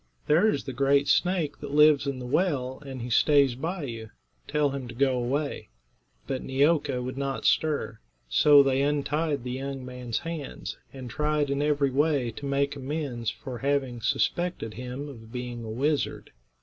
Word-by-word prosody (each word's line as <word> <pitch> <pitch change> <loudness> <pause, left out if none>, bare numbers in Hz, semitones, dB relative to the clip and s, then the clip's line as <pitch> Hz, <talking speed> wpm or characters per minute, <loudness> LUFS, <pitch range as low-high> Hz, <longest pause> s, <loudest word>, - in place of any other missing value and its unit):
There 170 +9 +4
is 145 - -1
the 135 - -6
great 140 +2 +3
snake 180 -5 +1
that 145 0 -5
lives 150 -1 +6
in 140 -1 -2
the 125 - -6
well, 130 -3 0
and 135 -3 -7
he 120 - -5
stays 140 +1 +4
by 165 +7 -4
you. 115 -4 -6 0.4
Tell 150 -1 +1
him 135 -2 -5
to 120 - -9
go 135 +1 +2
away." 135 - -2 0.6
But 130 -1 -3
Neeoka 140 -1 +1
would 130 +2 -5
not 135 -1 -3
stir. 145 -8 +1 0.3
So 140 - +6
they 135 0 +2
untied 145 0 0
the 125 - -4
young 135 0 -4
man's 125 -3 -4
hands, 165 -4 -5 0.2
and 130 -2 -8
tried 150 +2 0
in 140 +1 0
every 145 -2 +2
way 140 -3 +1
to 140 +5 -7
make 140 +1 0
amends 135 -4 -3
for 125 +1 -7
having 135 -4 -1
suspected 175 -1 0
him 125 +4 -6
of 115 -5 -11
being 125 -1 -5
a 110 - -6
wizard. 140 +6 -1
140 Hz, 175 wpm, -27 LUFS, 125-145 Hz, 0.6 s, lives